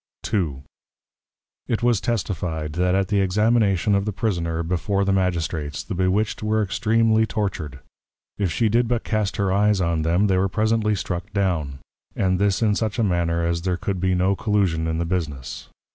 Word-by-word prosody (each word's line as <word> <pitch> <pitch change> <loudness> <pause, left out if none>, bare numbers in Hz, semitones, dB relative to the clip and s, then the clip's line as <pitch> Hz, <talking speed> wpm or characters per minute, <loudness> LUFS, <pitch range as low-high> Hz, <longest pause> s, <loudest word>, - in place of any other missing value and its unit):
II. 75 -10 -1 1.0
It 115 0 -1
was 120 -5 +3
testifi'd, 85 -8 -2
That 90 +2 +1
at 95 0 0
the 100 -2 +2
Examination 105 -1 +2
of 100 0 +1
the 105 - -1
Prisoner 85 -6 -1
before 95 +4 0
the 100 - +2
Magistrates, 85 -5 -1
the 110 - -5
Bewitched 95 +4 0
were 110 0 +1
extreamly 110 +4 +2
tortured. 80 -12 -3 0.6
If 95 -4 0
she 115 +7 +1
did 120 +3 +2
but 120 0 -1
cast 110 -3 -1
her 100 -2 +1
Eyes 105 0 +3
on 85 -3 0
them, 85 +6 +2
they 95 -2 +2
were 95 +1 +1
presently 110 0 +1
struck 90 +1 -4
down; 85 -9 -1 0.4
and 95 -1 +1
this 100 +1 +1
in 105 -2 +3
such 110 +2 -2
a 115 - +2
manner 85 -3 0
as 85 0 0
there 90 0 -1
could 95 0 -3
be 95 -1 +2
no 95 +2 +2
Collusion 95 -6 0
in 80 0 -1
the 85 - -1
Business. 75 -7 -4
95 Hz, 180 wpm, -23 LUFS, 85-105 Hz, 1.0 s, was